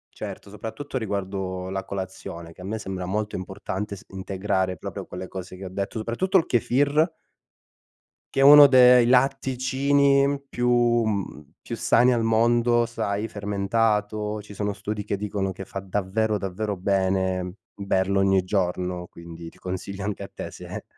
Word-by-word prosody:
certo, - - -7
soprattutto 120 +7 -5
riguardo 95 -3 -3
la 95 0 -3
colazione, 95 -3 -7
che 85 - -17
a - - -9
me 110 +4 -3
sembra 95 -3 -5
molto 105 +3 -2
importante 95 +2 -5
s 100 - -13
integrare 95 -1 -2
proprio - - -7
quelle 90 +1 -7
cose 95 -1 -8
che 95 - -9
ho - - -4
detto, 100 +4 -4
soprattutto 120 - +1
il 165 - 0
kefir. 145 +6 +2 1.3
Che - - +1
è - - +4
uno 145 +1 +10
de 125 -2 +7
i 120 - +3
latticini 135 +2 +2
più, 120 0 0
mhmm, 120 -4 +2
più - - -29 0.2
più - - -3
sani 125 +2 +4
al 115 - 0
mondo, 120 +1 +3
sai, 105 -2 -2
fermentato, 105 +1 -1
ci 105 - -12
sono 100 0 -2
studi 105 +1 -4
che 100 - -2
dicono 100 -1 -2
che 95 +1 -8
fa 95 - -5
davvero 105 +3 -1
davvero 100 +2 -3
bene, 95 -1 0 0.2
berlo 100 -1 0
ogni 95 -1 +3
giorno, 90 -2 -1
quindi 85 -1 -10
ti - - -22
consiglio 95 +2 -5
anche 105 -1 -3
a - - -9
te - - -6
se - - -8
100 Hz, 165 wpm, -25 LUFS, 95-120 Hz, 1.3 s, uno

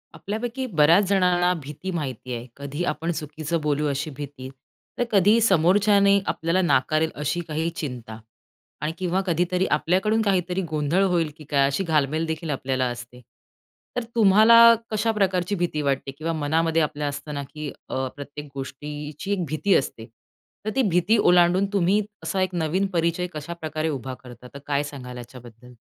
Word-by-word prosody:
आपल्यापैकी 235 +5 -4
बऱ्याच 165 +7 +6
जणांना 180 -2 +3
भीती 150 +7 -6
माहिती 130 -7 -4
आहे. 120 +1 -7
कधी 140 +4 -4
आपण 165 +2 -3
चुकीचं 155 +1 -3
बोलू 150 0 0
अशी 145 +2 -2
भीती, 140 -3 -7 0.5
तर - - +2
कधी 205 +3 +5
समोरच्याने 200 +1 +4
आपल्याला 165 +3 0
नाकारेल 155 -1 +2
अशी 150 +4 -2
काही 160 +1 -1
चिंता 120 -6 -6 0.6
आणि 150 +1 -1
किंवा 185 +1 0
कधीतरी 180 +2 +1
आपल्याकडून 190 +8 +2
काहीतरी 190 -3 0
गोंधळ 155 +4 +1
होईल, 175 -5 +1
की 155 - -11
काय 140 -2 +2
अशी 140 +8 -1
घालमेल 155 -1 +1
देखील 160 0 -4
आपल्याला 130 -2 -1
असते. 120 +1 -9 0.7
तर 245 - -1
तुम्हाला 230 +2 +7 0.2
कशा 215 +1 +1
प्रकारची 195 -2 0
भीती 175 -4 -1
वाटते 140 -1 -1
किंवा 165 +2 -2
मनामध्ये 160 +2 +1
आपल्या 150 -1 -1
असताना, 145 0 -5
की 150 +1 -7 0.2
अ, 130 0 -2
प्रत्येक 145 +1 -8
गोष्टीची 150 +6 -6
एक 185 -4 -1
भीती 155 +7 0
असते. 115 -4 -1 0.6
तर - - 0
ती 270 - +3
भीती 180 +6 +3
ओलांडून 180 0 +4
तुम्ही 200 +2 +3 0.2
असा 185 +4 -1
एक 185 -1 -1
नवीन 175 +4 0
परिचय 170 +1 0
कशाप्रकारे 155 0 -4
उभा 130 -3 -4
करता. 125 0 -12
तर 140 - -8
काय 145 0 +1
सांगाल 130 -4 -8
याच्याबद्दल? 125 0 -12
160 Hz, 155 wpm, -24 LUFS, 145-185 Hz, 0.7 s, तुम्हाला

